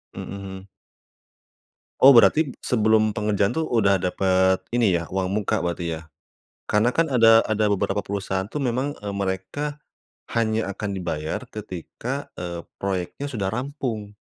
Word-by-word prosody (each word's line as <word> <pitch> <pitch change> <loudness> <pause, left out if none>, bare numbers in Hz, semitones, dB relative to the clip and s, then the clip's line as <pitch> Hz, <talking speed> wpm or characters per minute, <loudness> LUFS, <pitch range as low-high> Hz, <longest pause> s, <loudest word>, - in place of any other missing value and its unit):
Mhm. 95 0 -7 1.3
Oh 135 - +10
berarti 150 +6 +6
sebelum 110 -2 +3
pengerjaan 105 0 +1
tuh 160 +3 -1
udah 100 -5 +3
dapet 95 0 +2 0.2
ini 110 -7 +3
ya 85 - -4
uang 95 -1 0
muka 100 0 0
berarti 85 -1 -2
ya? - - -12 0.7
Karena 105 +3 +3
kan 165 +3 +2
ada 115 -3 +6
ada 110 0 +1
beberapa 100 0 0
perusahaan 95 -1 -2
tuh 150 - -3
memang, 135 +2 -1
eee, 100 -1 -5
mereka. 100 +10 -3 0.5
Hanya 110 -3 -1
akan 100 0 -4
dibayar 80 -4 -3
ketika, 110 - -6
eee, 85 -1 -5 0.2
proyeknya 95 +8 -3
sudah 105 -8 -2
rampung. 120 -5 -4
105 Hz, 135 wpm, -24 LUFS, 95-115 Hz, 1.3 s, Oh